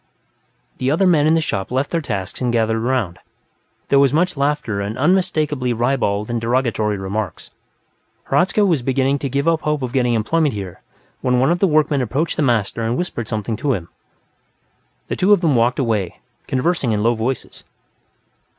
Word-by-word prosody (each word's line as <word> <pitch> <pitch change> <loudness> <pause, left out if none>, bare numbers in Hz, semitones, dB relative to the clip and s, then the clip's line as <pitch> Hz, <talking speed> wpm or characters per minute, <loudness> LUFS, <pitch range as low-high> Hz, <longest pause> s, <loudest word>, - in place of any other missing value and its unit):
The 130 - 0
other 165 +7 +2
men 155 -5 +4
in 160 - +4
the 165 - +2
shop 95 -10 -3
left 130 +3 -1
their 170 - 0
tasks 100 - -4
and 125 -1 +1
gathered 115 -1 +1
around; 120 -9 -1 0.7
there 140 - +5
was 140 -1 +4
much 175 +4 +1
laughter 140 -7 -1
and 105 +3 -4
unmistakably 150 -5 +1
ribald 120 -3 0
and 120 -1 -2
derogatory 115 -3 0
remarks. 95 0 -4 0.8
Hradzka 185 +9 +3
was 165 -8 +2
beginning 135 +2 +1
to 140 - -3
give 140 +4 -1
up 165 -1 +2
hope 150 -2 -1
of 125 -1 -4
getting 125 -3 +2
employment 145 +4 +1
here 95 -4 -7 0.4
when 125 -1 +1
one 135 +5 +3
of 175 - 0
the 195 - +3
workmen 150 -3 +2
approached 135 +8 -1
the - - -1
master 115 -5 +1
and 115 +2 -1
whispered 120 -11 -3
something 110 0 -3
to 140 +3 0
him. 85 -7 -5 1.2
The - - -2
two 195 +3 +4
of 200 - +3
them 160 -6 +2
walked 120 +2 +2
away, 110 -9 -1 0.3
conversing 130 -3 0
in 105 0 0
low 115 +1 +3
voices. 120 +3 -4
130 Hz, 180 wpm, -19 LUFS, 110-150 Hz, 1.2 s, there